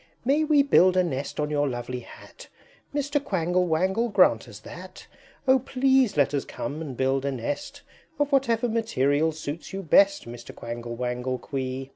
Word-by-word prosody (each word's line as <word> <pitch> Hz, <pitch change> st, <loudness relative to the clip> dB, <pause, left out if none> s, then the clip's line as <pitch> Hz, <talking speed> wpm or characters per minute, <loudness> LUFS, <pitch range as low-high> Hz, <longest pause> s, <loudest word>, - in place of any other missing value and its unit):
May 285 Hz, +5 st, +3 dB
we 300 Hz, -2 st, +4 dB
build 185 Hz, -9 st, +4 dB
a 185 Hz, -, +5 dB
nest 140 Hz, -4 st, -4 dB
on 150 Hz, 0 st, -1 dB
your 145 Hz, -1 st, +1 dB
lovely 120 Hz, 0 st, -4 dB
Hat? -, -, -14 dB, 0.4 s
Mr. 285 Hz, 0 st, -1 dB
Quangle 180 Hz, -, 0 dB
Wangle, 190 Hz, +8 st, +1 dB
grant 180 Hz, -, +3 dB
us 110 Hz, -4 st, -10 dB
that! 180 Hz, +10 st, -11 dB, 0.4 s
O 260 Hz, 0 st, +6 dB
please 265 Hz, -, +2 dB
let 145 Hz, 0 st, +3 dB
us 140 Hz, -, 0 dB
come 150 Hz, +2 st, -6 dB
and 140 Hz, -6 st, -6 dB
build 135 Hz, 0 st, +1 dB
a 140 Hz, -, -1 dB
nest 130 Hz, +2 st, -5 dB, 0.3 s
Of 290 Hz, 0 st, 0 dB
whatever 245 Hz, -4 st, +2 dB
material 160 Hz, -, +1 dB
suits 155 Hz, +3 st, -7 dB
you 195 Hz, 0 st, -4 dB
best, 195 Hz, 0 st, +4 dB
Mr. 120 Hz, 0 st, -10 dB
Quangle 120 Hz, 0 st, -6 dB
Wangle 125 Hz, +1 st, -2 dB
Quee!" 130 Hz, 0 st, -5 dB
160 Hz, 170 wpm, -25 LUFS, -, 0.4 s, O